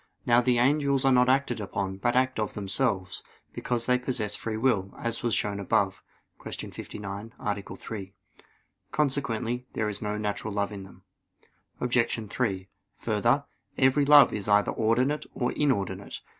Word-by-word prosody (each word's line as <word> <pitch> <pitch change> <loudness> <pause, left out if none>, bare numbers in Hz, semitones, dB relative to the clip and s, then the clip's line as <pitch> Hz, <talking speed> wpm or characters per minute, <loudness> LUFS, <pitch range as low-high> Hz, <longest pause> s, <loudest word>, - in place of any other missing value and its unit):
Now 120 0 +5
the 125 0 +2
angels 140 +1 +2
are 135 - +5
not 125 0 +5
acted 130 -4 +1
upon, 95 -1 -3
but 120 +5 0
act 130 -1 +2
of 105 - -2
themselves; 100 -2 -1 0.3
because 120 -2 -2
they 125 0 +3
possess 110 -5 -2
free 110 0 -3
will, 110 -6 +1
as 115 -1 -3
was 120 -2 +1
shown 100 -1 -1
above 95 -1 0 0.4
(Q. - - -6
59, 100 +2 -7
A. 100 -1 -2
3). 100 -3 -7 0.8
Consequently 125 -4 -1
there 110 - -1
is 105 -1 -3
no 105 -1 -2
natural 105 0 -3
love 100 0 0
in 100 -2 -7
them. 95 -1 -16 0.8
Obj. 120 -2 0
3: 95 -7 -1 0.3
Further, - - +1 0.3
every 135 +2 +4
love 145 -3 +8
is 105 -2 -4
either 105 0 +4
ordinate 125 +7 +1
or 125 -1 0
inordinate. 100 -9 -1
115 Hz, 155 wpm, -27 LUFS, 100-125 Hz, 0.8 s, love